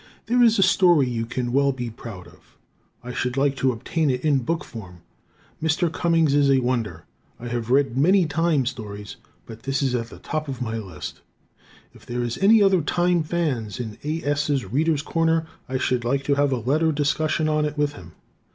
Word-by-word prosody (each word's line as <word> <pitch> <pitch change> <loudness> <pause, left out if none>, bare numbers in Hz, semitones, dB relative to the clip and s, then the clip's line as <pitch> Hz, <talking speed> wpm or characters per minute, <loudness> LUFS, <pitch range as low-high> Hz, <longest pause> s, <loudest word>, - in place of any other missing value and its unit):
There 245 +3 +2
is 230 -2 +5
a 195 - +5
story 180 -7 +4
you 115 -2 -3
can 120 0 -3
well 140 +1 +3
be 125 -3 -5
proud 105 -5 -9
of. - - -20 0.5
I 125 0 -6
should 125 +2 -2
like 140 0 +2
to 130 -1 +2
obtain 150 +6 -1
it 125 +2 -1
in 145 -3 +3
book 165 +7 -2
form. 90 -6 -10 0.6
Mr. 160 +1 +1
Cummings 165 -4 +2
is 145 -1 +4
a 135 - +5
wonder. 120 -10 -2 0.3
I 120 - -6
have 120 -1 -3
read 135 -1 +2
many 180 +7 +4
time 160 -3 +1
stories, 105 -4 -6 0.3
but 115 0 -11
his 135 +1 -1
is 130 -2 0
at 115 -2 -1
the - - -12
top 155 -1 -4
of 135 -3 -5
my 115 -2 -3
list. 95 -7 -8 0.7
If - - -18
there 120 0 -2
is 120 -1 -3
any 210 +2 +6
other 195 -3 +4
"time" 175 +2 +1
fan 155 -9 -1
in 110 -4 -6
A. 155 +2 -3
S.'s 145 -2 0
"Readers' 145 - 0
Corner" 165 0 +1 0.2
I 130 - -1
should 125 -1 0
like 135 +3 0
to 140 - +1
have 140 0 +2
a 130 - +1
letter 150 +8 +1
discussion 155 +2 0
on 155 0 +1
it 150 0 -4
with 145 0 +1
him. 85 - -12
140 Hz, 205 wpm, -23 LUFS, 120-160 Hz, 0.7 s, any